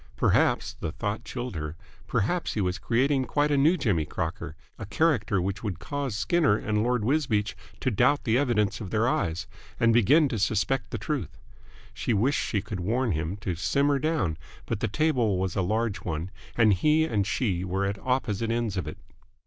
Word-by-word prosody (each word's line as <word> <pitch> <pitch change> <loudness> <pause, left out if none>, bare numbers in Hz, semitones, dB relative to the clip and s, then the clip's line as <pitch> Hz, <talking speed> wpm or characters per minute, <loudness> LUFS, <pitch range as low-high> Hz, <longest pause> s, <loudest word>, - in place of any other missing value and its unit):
Perhaps - - +2
the 80 - -3
thought 105 +6 -3
chilled 120 0 -5
her 75 0 -4 0.3
perhaps 120 - 0
he 105 - 0
was 90 -1 -1
creating 130 +3 +1
quite 145 +3 +1
a - - +3
new 155 +6 +4
Jimmy 100 - +1
Crocker, 80 0 -4 0.2
a 110 - -5
character 110 - +1
which 95 +3 -3
would 100 -5 -3
cause 140 -6 -4
Skinner 155 - +2
and 105 -1 -1
Lord 120 -1 +1
Wisbeach 120 -7 +1 0.3
to 130 - +1
doubt 125 +7 +3
the 115 -2 +1
evidence 110 -6 +1
of 100 - -5
their 110 +3 +1
eyes 85 -8 0 0.3
and 115 0 +4
begin 140 +7 +5
to 115 - -2
suspect 110 +3 0
the - - -3
truth. 120 - -4 0.6
She 115 - -1
wished 130 +8 +2
she 100 -4 -1
could 105 -3 -5
warn 115 +6 0
him 80 +3 -2
to 95 - -2
simmer 140 - +1
down, 130 - 0 0.3
but 115 - -2
the 115 - 0
table 120 -5 +1
was 95 0 -2
a 95 - +1
large 110 +3 0
one 85 +2 -4 0.3
and 110 -3 +5
he 150 - +3
and 105 -10 0
she 100 -4 0
were 95 +1 -1
at 100 0 -2
opposite 115 -4 -1
ends 115 -4 -1
of 95 - -2
it. - - -6
110 Hz, 190 wpm, -27 LUFS, 95-130 Hz, 0.6 s, begin